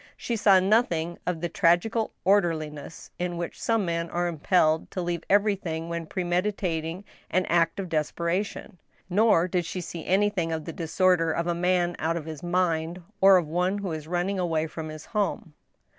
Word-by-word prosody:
She 235 Hz, -, -3 dB
saw 200 Hz, -3 st, +5 dB
nothing 185 Hz, -5 st, +1 dB
ot 175 Hz, -3 st, -1 dB
the 175 Hz, -, 0 dB
tragical 175 Hz, +7 st, +2 dB
orderliness 165 Hz, -6 st, 0 dB
in 175 Hz, -1 st, -2 dB
which 170 Hz, -1 st, -5 dB
some 225 Hz, -3 st, +1 dB
men 170 Hz, -1 st, -2 dB
are 175 Hz, 0 st, -1 dB
impelled 160 Hz, -1 st, +2 dB
to -, -, -5 dB
leave 175 Hz, -1 st, -2 dB
everything 190 Hz, -5 st, +1 dB
when 170 Hz, -1 st, -4 dB
premeditat 180 Hz, -2 st, -1 dB
ing 165 Hz, +5 st, -6 dB, 0.3 s
an 185 Hz, 0 st, +1 dB
act 165 Hz, +1 st, +1 dB
of 190 Hz, -, -3 dB
desperation; 170 Hz, +4 st, -2 dB, 0.3 s
nor 205 Hz, -3 st, +4 dB
did 180 Hz, -1 st, 0 dB
she 185 Hz, -, -5 dB
see 170 Hz, -1 st, -6 dB
anything 190 Hz, -3 st, +1 dB
of 160 Hz, -1 st, -3 dB
the 165 Hz, -, -6 dB
disorder 165 Hz, 0 st, +2 dB
of 170 Hz, +1 st, -1 dB
a 175 Hz, -, 0 dB
man 175 Hz, 0 st, +1 dB
out 165 Hz, +2 st, 0 dB
of 155 Hz, -, -6 dB
his 155 Hz, -3 st, -7 dB
mind, 175 Hz, -1 st, -1 dB, 0.2 s
or 195 Hz, 0 st, +8 dB
of 175 Hz, -, 0 dB
one 180 Hz, +5 st, 0 dB
who 200 Hz, -3 st, -4 dB
is 155 Hz, -1 st, -5 dB
running 180 Hz, +3 st, -1 dB
away 165 Hz, -3 st, 0 dB
from 160 Hz, 0 st, -6 dB
his 155 Hz, 0 st, -9 dB
home. 210 Hz, -4 st, -2 dB
175 Hz, 180 wpm, -26 LUFS, 165-190 Hz, 0.3 s, or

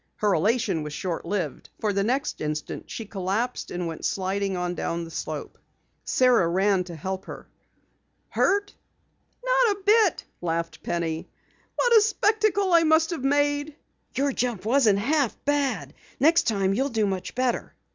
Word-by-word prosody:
Her 210 Hz, -2 st, +1 dB
elation 205 Hz, -1 st, +1 dB
was 150 Hz, -1 st, -6 dB
short 175 Hz, +1 st, -3 dB
lived, 180 Hz, -10 st, -3 dB
for 210 Hz, -2 st, 0 dB
the 200 Hz, 0 st, +1 dB
next 260 Hz, +6 st, -1 dB
instant 150 Hz, 0 st, -4 dB
she 225 Hz, -, -6 dB
collapsed 200 Hz, +5 st, -2 dB
and 175 Hz, 0 st, -3 dB
went 165 Hz, -1 st, -6 dB
sliding 195 Hz, 0 st, -1 dB
on 180 Hz, 0 st, -2 dB
down 170 Hz, -1 st, -3 dB
the 165 Hz, -, -9 dB
slope. -, -, -6 dB, 0.5 s
Sara 250 Hz, -9 st, +4 dB
ran 190 Hz, +2 st, +2 dB
to 175 Hz, -2 st, -8 dB
help 190 Hz, +4 st, -5 dB
her -, -, -8 dB
up. -, -, -25 dB, 0.8 s
"Hurt?" 405 Hz, +1 st, +1 dB, 0.7 s
"Not -, -, +3 dB
a -, -, -16 dB
bit," 420 Hz, -3 st, +4 dB, 0.2 s
laughed 165 Hz, -1 st, -3 dB
Penny. 165 Hz, -2 st, -3 dB, 0.5 s
"What 485 Hz, -1 st, +3 dB
a 440 Hz, -, +8 dB
spectacle 420 Hz, -2 st, +2 dB
I 335 Hz, -, +7 dB
must 320 Hz, +1 st, +3 dB
have 320 Hz, -6 st, -4 dB
made!" 290 Hz, +1 st, +1 dB, 0.4 s
"Your 280 Hz, +1 st, +1 dB
jump 240 Hz, -7 st, -2 dB
wasn't 225 Hz, -4 st, +4 dB
half 275 Hz, +4 st, +1 dB
bad. 285 Hz, -2 st, 0 dB, 0.3 s
Next 330 Hz, +4 st, +4 dB
time 195 Hz, -3 st, +1 dB
you'll 270 Hz, +7 st, 0 dB
do 220 Hz, -4 st, +1 dB
much 190 Hz, -2 st, -3 dB
better." 255 Hz, -1 st, -1 dB
225 Hz, 160 wpm, -25 LUFS, 185-290 Hz, 0.8 s, a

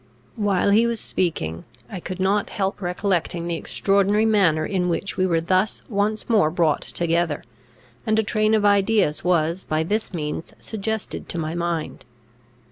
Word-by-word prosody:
While 200 Hz, -2 st, +1 dB
he 225 Hz, +3 st, +5 dB
was 235 Hz, -1 st, -2 dB
speaking, 85 Hz, -, -2 dB, 0.2 s
I 190 Hz, -, -6 dB
could 185 Hz, +1 st, -6 dB
not 200 Hz, +2 st, +1 dB
help 195 Hz, -1 st, -2 dB
recollecting 175 Hz, -2 st, -1 dB
the 170 Hz, -1 st, -1 dB
extraordinary 200 Hz, +5 st, +2 dB
manner 185 Hz, -8 st, +3 dB
in 180 Hz, -1 st, 0 dB
which 185 Hz, +3 st, -2 dB
we 185 Hz, -, +1 dB
were 165 Hz, -2 st, +1 dB
thus 185 Hz, +5 st, 0 dB
once 210 Hz, 0 st, -1 dB
more 210 Hz, -9 st, +4 dB
brought 165 Hz, -2 st, +1 dB
together, 170 Hz, -2 st, -1 dB, 0.6 s
and 220 Hz, 0 st, +1 dB
a 220 Hz, -, +3 dB
train 215 Hz, +1 st, +2 dB
of 210 Hz, -1 st, +2 dB
ideas 200 Hz, -5 st, +3 dB
was 170 Hz, 0 st, +1 dB
by 155 Hz, +1 st, 0 dB
this 210 Hz, +6 st, -1 dB
means 155 Hz, -2 st, -4 dB
suggested 220 Hz, 0 st, -4 dB
to -, -, -4 dB
my 160 Hz, -1 st, -2 dB
mind. 170 Hz, -2 st, -3 dB
185 Hz, 160 wpm, -23 LUFS, 170-205 Hz, 0.6 s, he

